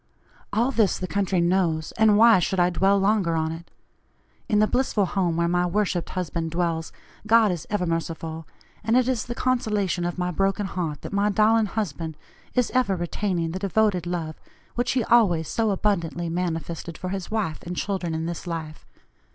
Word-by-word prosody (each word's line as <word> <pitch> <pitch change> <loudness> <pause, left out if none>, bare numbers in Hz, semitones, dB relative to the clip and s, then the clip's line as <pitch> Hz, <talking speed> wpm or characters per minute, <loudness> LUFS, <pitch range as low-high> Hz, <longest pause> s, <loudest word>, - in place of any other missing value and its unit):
All 235 +5 +1
this 220 -6 +2
the 185 - -4
country 195 -1 0
knows, 170 -3 +1
and 220 -2 +4
why 225 -2 +7
should 185 +2 -1
I 175 0 +3
dwell 195 +3 +3
longer 195 -4 +2
on 160 0 0
it? 165 +1 -9 0.8
In 210 - +3
the 210 - +5
blissful 235 -4 +1
home 180 -3 0
where 170 0 +2
my 175 +1 +1
worshipped 185 -2 -1
husband 170 -2 -3
dwells 165 -1 -1 0.4
God 225 -2 +5
is 175 -3 -5
ever 205 -4 0
merciful, 165 -1 -4 0.4
and 225 +3 +3
it 255 -1 +3
is 255 -4 0
the 240 - -5
consolation 215 -9 0
of 175 0 -3
my 180 0 -1
broken 195 +3 0
heart 165 -6 -4
that - - -7
my 200 +1 +2
darling 215 +2 +3
husband 165 -7 -4 0.4
is 250 -2 +1
ever 250 -7 +2
retaining 175 -1 -2
the 185 - -4
devoted 195 -2 +1
love 165 -3 -4 0.3
which 245 0 0
he 255 -2 +1
always 185 -10 +3
so 225 +4 0
abundantly 175 -4 -1
manifested 170 -1 -3
for 185 - -5
his 190 -1 -4
wife 210 -8 -2
and 175 0 -6
children 185 -5 -2
in 160 0 -2
this 170 +1 -5
life. 160 - -6
185 Hz, 185 wpm, -24 LUFS, 170-210 Hz, 0.8 s, why